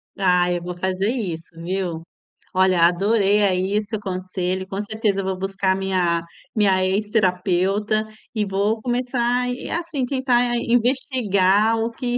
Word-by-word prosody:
Ah, 180 Hz, -2 st, +2 dB
eu 175 Hz, -, -1 dB
vou 175 Hz, 0 st, -6 dB
fazer 190 Hz, +3 st, -1 dB
isso, 180 Hz, -10 st, -4 dB
viu. 175 Hz, -2 st, -3 dB, 0.5 s
Olha, 185 Hz, -2 st, +3 dB
adorei, 200 Hz, +3 st, +3 dB
aí, 190 Hz, +1 st, +1 dB
seu 215 Hz, 0 st, -5 dB
conselho, 185 Hz, -1 st, -3 dB
com 195 Hz, 0 st, -3 dB
certeza 210 Hz, -2 st, -1 dB
vou 190 Hz, -1 st, -2 dB
buscar 195 Hz, 0 st, -1 dB
a -, -, -2 dB
minha 180 Hz, -3 st, 0 dB, 0.3 s
minha 195 Hz, -3 st, +3 dB
ex-terapeuta, 195 Hz, +1 st, +1 dB, 0.3 s
e 215 Hz, -3 st, 0 dB
vou 200 Hz, +3 st, 0 dB
começar 245 Hz, 0 st, 0 dB
e, 245 Hz, -, -5 dB
assim, 330 Hz, -6 st, -2 dB
tentar 245 Hz, -2 st, +1 dB
investigar 225 Hz, -4 st, +2 dB
o 225 Hz, +1 st, -1 dB
que 245 Hz, +1 st, -2 dB
200 Hz, 140 wpm, -22 LUFS, 185-230 Hz, 0.5 s, Olha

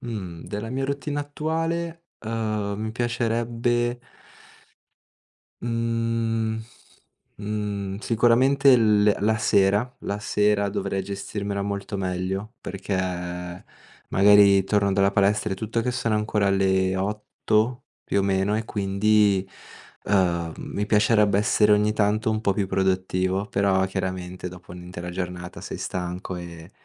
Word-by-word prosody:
Mhmm, 95 Hz, -8 st, -6 dB
della 105 Hz, +2 st, -5 dB
mia 135 Hz, +2 st, -2 dB
routine 140 Hz, +1 st, -3 dB
attuale, 165 Hz, +3 st, -3 dB, 0.2 s
uhm, 110 Hz, -2 st, -2 dB
mi 110 Hz, 0 st, -3 dB
piacerebbe 120 Hz, 0 st, -1 dB, 1.6 s
mhmm, 115 Hz, -1 st, -1 dB, 0.8 s
mhmm, 100 Hz, -2 st, -3 dB
sicuramente 125 Hz, +5 st, +4 dB
l 105 Hz, -2 st, +4 dB
le 105 Hz, -1 st, +4 dB
la 110 Hz, +2 st, +2 dB
sera, 105 Hz, +3 st, +2 dB
la 100 Hz, -, -3 dB
sera 105 Hz, -1 st, +1 dB
dovrei 100 Hz, -1 st, -2 dB
gestirmela 100 Hz, +1 st, -4 dB
molto 100 Hz, 0 st, -3 dB
meglio, 95 Hz, +4 st, -3 dB
perché 100 Hz, 0 st, -4 dB, 1.1 s
magari 100 Hz, 0 st, +6 dB
torno 100 Hz, 0 st, +1 dB
dalla 100 Hz, 0 st, +3 dB
palestra 100 Hz, 0 st, +2 dB
e -, -, 0 dB
tutto 110 Hz, +3 st, -2 dB
che 125 Hz, -, 0 dB
sono 120 Hz, -3 st, -1 dB
ancora 105 Hz, -1 st, +1 dB
le 95 Hz, -1 st, +2 dB
8 105 Hz, +4 st, -1 dB, 0.2 s
più 100 Hz, -, +1 dB
o -, -, 0 dB
meno 95 Hz, +2 st, +1 dB
e 110 Hz, -, -2 dB
quindi, 100 Hz, -1 st, +2 dB, 0.6 s
uhm, 85 Hz, -5 st, +1 dB
mi 105 Hz, -, -4 dB
piacerebbe 105 Hz, -1 st, +3 dB
essere 105 Hz, 0 st, +3 dB
ogni 105 Hz, +1 st, +3 dB
tanto 110 Hz, +1 st, +1 dB
un 110 Hz, 0 st, -1 dB
po' 100 Hz, -3 st, +1 dB
più 100 Hz, -1 st, 0 dB
produttivo, 95 Hz, 0 st, 0 dB
però 95 Hz, -2 st, +2 dB
chiaramente 90 Hz, -1 st, -4 dB
dopo 90 Hz, 0 st, -12 dB
un'intera 90 Hz, 0 st, -7 dB
giornata 90 Hz, 0 st, -5 dB
sei -, -, -6 dB
stanco 90 Hz, 0 st, -4 dB
e 85 Hz, -1 st, -9 dB
105 Hz, 125 wpm, -24 LUFS, 95-115 Hz, 1.6 s, magari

